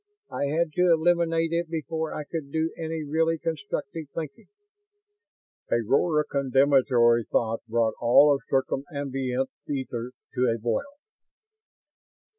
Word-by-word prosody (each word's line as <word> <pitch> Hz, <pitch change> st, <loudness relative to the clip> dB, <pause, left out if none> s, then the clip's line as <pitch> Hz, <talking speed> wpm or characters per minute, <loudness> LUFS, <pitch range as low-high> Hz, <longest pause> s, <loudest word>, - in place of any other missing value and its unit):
I -, -, -1 dB
had 155 Hz, +3 st, 0 dB
to 180 Hz, +1 st, +3 dB
eliminate 165 Hz, 0 st, +2 dB
it 170 Hz, 0 st, -1 dB
before 160 Hz, 0 st, -3 dB
I 150 Hz, -, -4 dB
could 145 Hz, -2 st, -6 dB
do 160 Hz, +1 st, -1 dB
any 160 Hz, -1 st, -4 dB
really 160 Hz, +2 st, +1 dB
constructive 160 Hz, -1 st, -4 dB
thinking." 165 Hz, +8 st, -6 dB, 1.2 s
A -, -, +4 dB
roar 150 Hz, +5 st, +3 dB
of 150 Hz, -, -7 dB
condemnatory 130 Hz, -4 st, +3 dB
thought 115 Hz, 0 st, 0 dB
brought 115 Hz, -1 st, +1 dB
all 140 Hz, +4 st, +5 dB
circumambient 135 Hz, -1 st, -2 dB, 0.2 s
ether 125 Hz, -4 st, -3 dB, 0.2 s
to 125 Hz, 0 st, +2 dB
a 115 Hz, -, 0 dB
boil. 120 Hz, -, -2 dB
145 Hz, 120 wpm, -26 LUFS, 130-165 Hz, 1.2 s, all